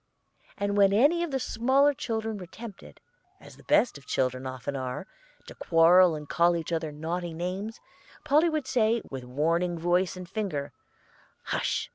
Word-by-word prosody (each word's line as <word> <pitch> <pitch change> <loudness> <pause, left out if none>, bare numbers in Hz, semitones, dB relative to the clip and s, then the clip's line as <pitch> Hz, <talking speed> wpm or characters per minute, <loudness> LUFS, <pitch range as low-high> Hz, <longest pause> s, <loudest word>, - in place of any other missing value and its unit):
And 200 0 -1
when 200 -1 +5
any 290 +11 +4
of 345 - -1
the 270 -2 -1
smaller 265 +4 +2
children 220 -4 -3
were 180 - -9
tempted, 220 +1 -11 0.4
as - - -14
the - - -18
best 290 - +2
of 140 - -22
children 130 0 -1
often 130 +2 -5
are, 130 +5 -4 0.4
to - - -10
quarrel 170 +1 +5
and 150 -1 -8
call 170 +2 +3
each 165 0 -4
other 160 -2 -2
naughty 165 +3 -4
names, 190 +6 -4 0.4
Polly 305 +3 +3
would 310 -4 -2
say, 230 -3 +1
with 135 -2 -6
warning 165 +7 0
voice 175 +2 +1
and 180 -1 -8
finger, 170 -9 -4 0.7
'Hush! - - -1
180 Hz, 165 wpm, -27 LUFS, 160-225 Hz, 0.7 s, when